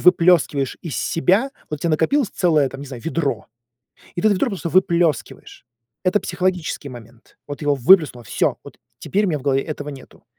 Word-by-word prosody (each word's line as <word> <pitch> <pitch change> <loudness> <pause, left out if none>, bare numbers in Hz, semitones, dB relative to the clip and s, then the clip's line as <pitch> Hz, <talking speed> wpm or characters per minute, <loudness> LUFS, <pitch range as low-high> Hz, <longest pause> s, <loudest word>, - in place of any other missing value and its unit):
выплёскиваешь 165 -6 +3
из 165 - -5
себя. 195 +10 +1 0.2
Вот 150 - -3
у - - -13
тя 170 - +1
накопилось 180 - +2
целое 155 -6 +2
там, 135 - -9
не 145 - -8
знаю, 130 -4 -9
ведро, 145 -9 -2 0.7
и - - -3
ты 215 - +4
это 205 - +3
ведро 225 +8 0
просто 190 -6 -4
выплёскиваешь. 170 -5 0 0.4
Это 185 +3 +2
психологический 180 -5 -2
момент. 120 -2 -14
Вот 145 +1 -7
его 145 -1 +2
выплеснуло, 135 -3 +4
всё, - - -1
вот - - -13 0.2
теперь 205 +2 0
у - - 0
меня 155 -4 -1
в - - -13
голове 135 -1 +1
этого 150 -1 -6
нету. 135 -2 -13
160 Hz, 190 wpm, -21 LUFS, 140-180 Hz, 0.7 s, ты